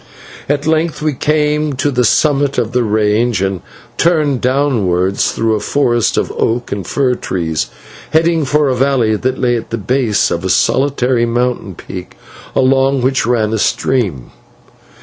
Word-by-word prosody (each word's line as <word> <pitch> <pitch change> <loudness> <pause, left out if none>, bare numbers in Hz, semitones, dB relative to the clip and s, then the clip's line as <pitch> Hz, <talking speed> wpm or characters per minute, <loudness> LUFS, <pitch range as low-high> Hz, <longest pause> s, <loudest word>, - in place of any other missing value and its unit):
At 145 0 0
length 160 0 0
we 155 -1 +1
came 150 +1 0
to 140 +2 -1
the 125 -1 +1
summit 140 +3 +2
of 120 -2 0
the 125 -1 +1
range, 110 +1 +1
and 95 -2 -2 0.4
turned 155 -6 +2
downwards 105 -9 +1
through 115 0 0
a 105 - 0
forest 120 -1 +1
of - - 0
oak 120 +2 -1
and 100 -4 -4
fir 130 -3 +1
trees, 80 -9 -3 0.4
heading 165 +1 +2
for 145 +1 +1
a 130 - +1
valley 125 -4 +1
that 130 +4 -2
lay 120 -2 +1
at 115 - -7
the 115 - -3
base 115 0 0
of - - -2
a - - -2
solitary 130 -3 +1
mountain 120 -5 -1
peak, 90 +1 -9 0.4
along 135 0 +2
which 130 -3 +1
ran 110 -3 +1
a 110 - 0
stream. 100 - -1
125 Hz, 160 wpm, -15 LUFS, 110-140 Hz, 0.4 s, summit